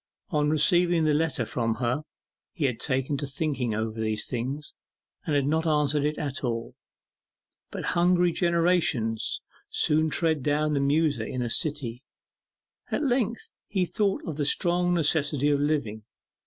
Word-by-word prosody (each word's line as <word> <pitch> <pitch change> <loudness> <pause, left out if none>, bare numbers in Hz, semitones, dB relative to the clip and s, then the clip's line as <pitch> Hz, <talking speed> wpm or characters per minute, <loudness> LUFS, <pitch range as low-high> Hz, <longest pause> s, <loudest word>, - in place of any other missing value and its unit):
On 150 -1 +1
receiving 170 +2 +4
the 155 -1 +2
letter 150 -5 0
from 115 0 -1
her 125 +4 -1 0.5
he 155 - -1
had 125 -4 -1
taken 135 +2 -1
to 145 - -4
thinking 135 -5 -2
over 110 +1 -3
these 110 -1 -1
things, 135 +4 -4 0.5
and 150 - +1
had 140 -1 +2
not 160 +3 0
answered 150 -1 +2
it 150 0 -1
at 140 -2 -4
all. 115 -2 -3 1.0
But - - -6
'hungry 175 0 +3
generations' 170 - +1 0.3
soon 155 +1 +3
tread 160 -2 0
down 150 +2 0
the 140 - +1
muser 140 -3 +1
in 125 +2 -3
a 120 - -3
city. 140 -7 0 0.9
At - - -1
length 240 -4 -1 0.2
he 190 -3 0
thought 195 +3 -1
of 155 -3 -4
the 145 - 0
strong 175 +2 +2
necessity 145 -3 +2
of 145 - +2
living. 140 -8 -1
150 Hz, 155 wpm, -26 LUFS, 130-165 Hz, 1.0 s, receiving